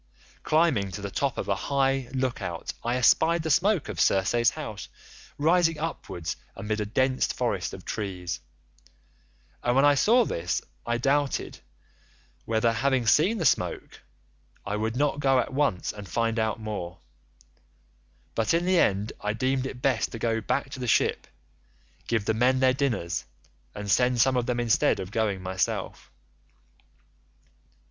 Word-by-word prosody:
Climbing 155 - +2
to 100 - -6
the 100 -1 -5
top 140 +3 -1
of - - -3
a 100 - +2 0.2
high 135 -2 +1
look 130 -3 -2
out 85 -3 -4
I 120 +1 0
espied 160 +7 +3
the 160 - -1
smoke 185 +2 +2
of 105 -6 -6
Circe's 115 +5 +3
house 110 -10 -7 0.5
rising 165 +1 +3
upwards 120 - -4 0.2
amid 105 +1 -3
a 105 - -2
dense 130 +4 +1
forest - - -2
of - - -10
trees, 90 -5 -4 1.2
and 120 0 +1
when 135 +2 +5
I 145 - +6
saw 230 - +4
this 85 +1 -2 0.3
I 120 0 +1
doubted 140 +3 0 0.9
whether, 115 +1 +1
having 130 0 +1
seen 170 - +4
the 170 - -2
smoke, 90 - 0 0.6
I 100 - -2
would 110 +2 -2
not 145 +1 +1
go 135 -2 +3
on 125 - +3
at - - -10
once 135 -10 0
and 105 -3 -10
find 115 +4 0
out 110 0 -1
more, 100 -5 -5 1.4
but 115 +8 +1
in 170 +1 +1
the 185 -1 +3
end 100 +2 +1
I 105 0 -1
deemed 130 +3 0
it 125 -1 -9
best 130 -5 +1
to - - -4
go 115 0 0
back 135 +5 -2
to 140 - -7
the 125 - -3
ship, - - +1 0.8
give 115 -3 0
the 110 - +1
men 125 +4 +2
their 130 -1 +4
dinners, 120 - -1 0.5
and 105 -1 -3
send 125 +1 +3
some 130 +3 +4
of 125 -1 0
them 120 -1 0
instead 115 -4 +2
of 95 0 -6
going 105 -4 -1
myself. 95 -1 -3
120 Hz, 160 wpm, -26 LUFS, 105-140 Hz, 1.4 s, I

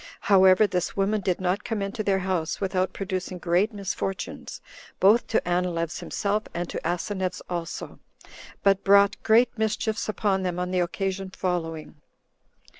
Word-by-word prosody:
However, 190 0 +6
this 180 -2 -2
woman 200 +2 +1
did 185 -2 0
not 185 +2 0
come 225 -2 -2
into 200 +3 -3
their 195 -2 +2
house 175 -4 -1
without 185 -1 0
producing 185 -2 -4
great 180 +5 +1
misfortunes, 195 -2 -4 0.4
both 210 +5 +5
to 220 - 0
Anileus 175 -2 -1
himself, 210 0 -1
and 175 0 -2
to - - -3
Asineus 180 +2 -2
also; 170 -2 -5 0.6
but 195 -1 +3
brought 200 0 +5
great 235 +2 +4
mischiefs 220 0 -1
upon 200 -2 0
them 180 -2 -2
on 180 0 -2
the 185 - +1
occasion 190 +2 -2
following. 165 -5 -4
190 Hz, 145 wpm, -26 LUFS, 180-200 Hz, 0.6 s, However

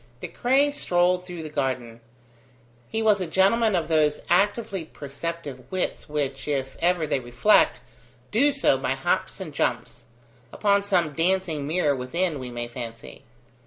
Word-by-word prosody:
De - - -5
Craye 275 +4 +2
strolled 180 -8 +1
through 175 -3 -6
the - - -5
garden. 130 -5 -3 0.9
He 225 0 -1
was 210 -3 +4
a 180 - -2
gentleman 200 +5 +3
of 165 -3 0
those 155 -2 +2
actively 200 0 +1
perceptive 145 -3 -7
wits 185 -4 -3
which, 140 -2 -3
if 135 -2 -2
ever 175 -1 +2
they 150 -2 0
reflect, 120 -1 +3 0.5
do 275 +7 +4
so - - +2
by - - 0
hops - - -1
and - - -7
jumps: - - -2 0.5
upon 200 -1 +2
some 175 -6 +1
dancing 165 -3 0
mirror 155 -3 +1
within, 150 +5 -1
we 130 -1 -6
may 120 0 -5
fancy. 115 -2 -9
165 Hz, 150 wpm, -25 LUFS, 135-190 Hz, 0.9 s, was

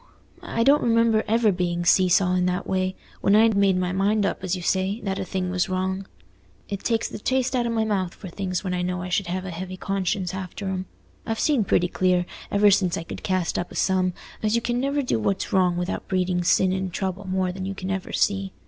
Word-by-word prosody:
I 230 - -1
don't 280 +4 +5
remember 230 -1 +3
ever 225 0 +3
being 175 -1 -1
see 185 +1 +5
saw 180 +1 +3
in 180 0 +2
that 180 +1 -1
way, 185 0 -1 0.3
when 200 - +4
I'd 220 0 +5
made 195 -2 +3
my 180 0 0
mind 200 +2 +1
up, 195 - -2
as 185 0 0
you 180 - -6
say, 190 +4 0
that 195 -1 -2
a - - -1
thing 185 -1 -3
was 180 0 0
wrong. 190 +1 -2 0.6
It 200 - -4
takes 225 +1 0
the - - -7
taste 260 +3 0
out 240 -1 +1
o' - - -1
my 225 -1 0
mouth 190 -4 -1
for 195 - -9
things, 185 0 -3
when 185 -2 -2
I 180 - -1
know 180 0 -2
I 180 - -5
should 185 +1 0
have 185 +2 -3
a 185 - -5
heavy 185 +2 -6
conscience 190 -1 -2
after 190 +1 -5
'em. 190 -1 -3 0.4
I've 225 0 -3
seen 285 -8 +2
pretty 180 -1 +2
clear, 180 0 +1 0.2
ever 205 0 +5
since 185 -3 +2
I - - -4
could - - -8
cast 185 -3 0
up 175 - -4
a - - -10
sum, 185 -1 +1 0.3
as 215 +1 +1
you 235 - +2
can 240 0 0
never 280 +2 0
do 245 - 0
what's 190 - -1
wrong 180 -2 +3
without 175 +1 -3
breeding 180 -2 0
sin 185 +2 +3
and 190 -1 -2
trouble 190 +2 -3
more 185 -1 0
than 190 +1 -5
you 195 - -4
can 190 0 -4
ever 190 -1 -3
see. 195 -1 0
190 Hz, 240 wpm, -24 LUFS, 180-205 Hz, 0.6 s, don't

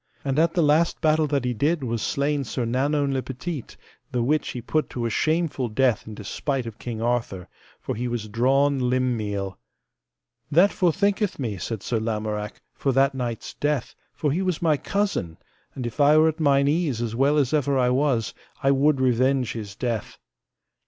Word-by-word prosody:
And 135 +1 +1
at 165 +2 +2
the 170 - +3
last 155 +3 +3
battle 155 -1 +3
that 140 -3 0
he 125 - 0
did 145 +6 0
was 115 -2 -2
slain 140 +3 0
Sir 125 0 -3
Nanowne 140 +4 +1
le 130 - 0
Petite, 135 +2 -6 0.3
the 120 -1 0
which 150 +5 +1
he 125 - -5
put 155 +6 -1
to 120 -4 -3
a 115 - -1
shameful 155 -2 0
death 120 0 +1
in 110 - -7
despite 130 +5 -3
of 115 -2 -8
King 115 -2 -5
Arthur, 115 -7 -1 0.3
for - - -4
he 120 +3 -3
was 120 -3 -3
drawn 130 +4 +2
limb 130 -1 +1
meal. 100 -3 -4 0.9
That 175 +7 +5
forthinketh 200 +3 +1
me, 110 -8 -3
said 110 +3 -4
Sir 115 - -1
Lamorak, 105 -1 -3
for 135 - -1
that 135 +1 +3
knight's 120 -4 -4
death, 145 -4 -1 0.2
for 150 - -1
he 170 +6 0
was 185 -4 -1
my 160 -3 +3
cousin; 195 - -2 0.4
and 130 - -4
if 120 +4 -6
I 145 +2 +6
were 160 +1 +6
at 160 +1 -5
mine 140 -2 +3
ease 150 -5 +1
as 115 -1 -3
well 140 +4 +3
as 140 -1 +1
ever 145 -2 +2
I 125 -1 +3
was, 130 -4 +1 0.3
I 135 - +4
would 140 +1 +3
revenge 130 0 +2
his 105 -4 -7
death. 115 -3 -3
135 Hz, 190 wpm, -24 LUFS, 115-150 Hz, 0.9 s, I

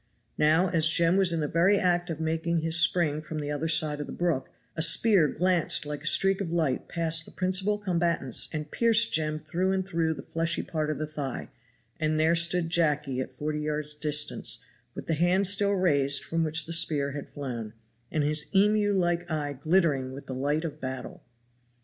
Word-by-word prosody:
Now 160 +5 +3
as 165 -2 +2
Jem 170 +1 +3
was 190 -2 +4
in 165 -1 -2
the 150 - -1
very 175 +7 +2
act 175 -1 0
of 160 -2 -5
making 165 +1 -2
his 165 0 +2
spring 170 -3 +3
from 155 0 -7
the 145 0 -4
other 150 +2 -3
side 155 -2 +2
of 145 - -5
the - - -8
brook, 165 -7 -2 0.3
a 160 - -3
spear 170 +1 +4
glanced 175 -1 0
like 150 -1 -6
a 155 - -3
streak 195 +4 +3
of 175 -4 -4
light 160 -6 -1
past 165 -1 0
the - - -11
principal 190 +3 0
combatants 170 - -1
and 150 -1 -6
pierced 230 -1 +3
Jem 155 -1 0
through 175 +5 -2
and 190 -1 -2
through 165 -3 -1
the 135 - -10
fleshy 165 +1 -1
part 155 -2 -3
of 155 - -3
the 155 - -3
thigh, 145 -3 -6 0.5
and 155 0 0
there 160 +2 +3
stood 170 0 +2
Jacky 150 -6 0
at - - -8
forty 150 0 -4
yards' 150 0 -4
distance, 150 0 +1 0.3
with - - -8
the 165 - -1
hand 175 +5 +2
still 200 +1 +3
raised 140 -7 +1
from 165 0 -2
which 155 0 +2
the 165 - -3
spear 145 -4 +1
had 145 0 -8
flown, 120 -6 -7 0.4
and 155 - -1
his 150 +1 +2
emu 205 0 +2
like 175 -1 -1
eye 150 -2 -3
glittering 145 -4 0
with 140 - -10
the 130 - -7
light 145 +5 -2
of 155 - -7
battle. 130 -1 -7
160 Hz, 200 wpm, -26 LUFS, 150-175 Hz, 0.5 s, was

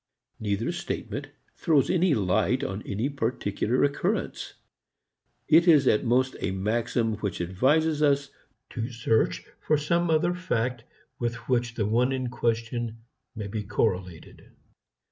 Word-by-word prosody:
Neither 105 +1 -1
statement - - -5 0.3
throws 150 -5 +2
any 180 -4 +3
light 110 +6 +1
on 95 -4 -3
any 105 +6 -1
particular 120 -3 -1
occurrence. 140 0 -1 0.9
It 165 +3 +5
is 150 -5 +6
at 105 - +3
most 130 +2 +2
a - - -1
maxim 110 +3 -1
which 100 -3 -3
advises 145 - +1
us 140 -1 +2 0.4
to 115 -1 -3
search 115 -2 0
for 155 - +1
some 170 +3 +1
other 160 +2 +2
fact 125 -9 -2 0.3
with 120 0 -1
which 120 -2 0
the 110 - 0
one 120 +5 +2
in 130 -2 -2
question 115 -1 -2 0.3
may 105 -2 -5
be 105 +2 -4
correlated. 95 -4 -3
120 Hz, 130 wpm, -27 LUFS, 110-140 Hz, 0.9 s, is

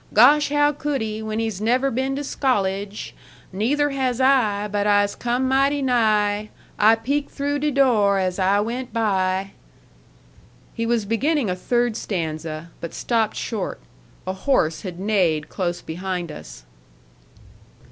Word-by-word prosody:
Gosh! 280 +8 +6
how 290 0 +3
could 290 -1 -2
he, 215 0 -3
when 215 0 -4
he's 220 -3 -2
never 255 +5 +2
been 265 +3 -1
to 285 - -3
scollege? 205 -7 -1 0.4
Neither 285 +9 +1
has 260 -3 -1
I. 230 -6 +3
But 205 0 -1
I'se 205 0 +3
come 245 +2 -1
mighty 275 +2 +2
nigh; 215 -4 +2 0.3
I 220 +2 +6
peaked 280 +6 -2
through 285 0 -2
de 300 +1 +1
door 235 -8 +3
as 185 0 -1
I 195 +2 +3
went 240 +4 -4
by.'" 195 -3 0 1.2
He 230 -1 -2
was 230 -3 +1
beginning 245 - 0
a - - -1
third 240 +4 0
stanza, 160 -4 -4
but 170 - -6
stopped 225 -3 0
short; 215 -5 -4 0.5
a 185 - -2
horse 190 - +1
had 180 -4 -7
neighed 185 -7 +1
close 175 -2 -3
behind 180 0 -4
us. - - -11
220 Hz, 145 wpm, -22 LUFS, 190-260 Hz, 1.2 s, Gosh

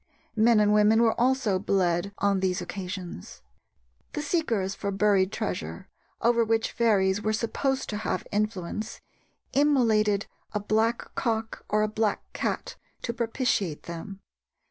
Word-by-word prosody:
Men 225 0 +5
and 210 0 +4
women 210 +2 +5
were 225 - +4
also 250 -6 +2
bled 185 -1 +1
on 200 -1 +2
these 185 -1 0
occasions. 180 - -7 0.7
The 295 - -3
seekers 235 - 0
for 200 - -4
buried 195 -1 +2
treasure, - - -4 0.3
over 235 0 +4
which 225 0 +1
fairies 205 -4 +2
were 215 +1 0
supposed 265 +4 -1
to 210 - -2
have 220 - -2
influence, 215 0 -2 0.5
immolated 225 -8 +3 0.3
a 210 - 0
black 220 +3 0
cock 225 -2 -2
or 210 0 +2
a - - +2
black 215 0 0
cat - - -3 0.3
to 235 - -2
propitiate 230 - -1
them. 190 +4 -7
215 Hz, 135 wpm, -27 LUFS, 195-230 Hz, 0.7 s, Men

